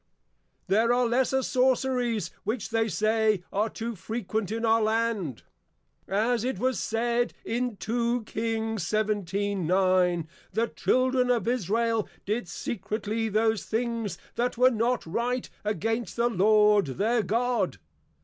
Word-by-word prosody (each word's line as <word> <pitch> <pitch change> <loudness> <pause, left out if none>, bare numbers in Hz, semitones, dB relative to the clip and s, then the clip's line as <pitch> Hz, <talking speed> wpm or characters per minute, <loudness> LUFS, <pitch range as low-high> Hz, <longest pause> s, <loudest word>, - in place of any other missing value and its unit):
There 225 +4 +3
are 245 0 +3
lesser 260 +2 +1
Sorceries 250 -6 +1
which 225 0 -3
they 225 0 +2
say, 215 -2 +1
are 210 +3 +1
too 230 +1 -5
frequent 220 0 -3
in 225 +1 -1
our 225 0 +4
Land. 215 - 0 0.6
As 225 +4 +1
it 260 +1 -1
was 260 0 0
said 235 +1 0
in 240 -1 -2
2 235 +2 -1
King. 225 0 -2
17.9. 190 -3 +1 0.3
_The 230 +1 0
Children 255 0 +2
of 240 -2 +1
+Israel+ 230 -1 +1 0.2
did 215 0 -1
secretly 220 +3 -3
those 220 +1 +1
things 225 -5 -2 0.2
that 240 +1 -1
were 255 +1 +6
not 235 +1 0
right, 240 +8 -1 0.2
against 220 +2 -2
the 235 0 +2
Lord 210 -2 +4
their 230 +3 +2
God. 240 +4 0
225 Hz, 125 wpm, -27 LUFS, 210-240 Hz, 0.6 s, were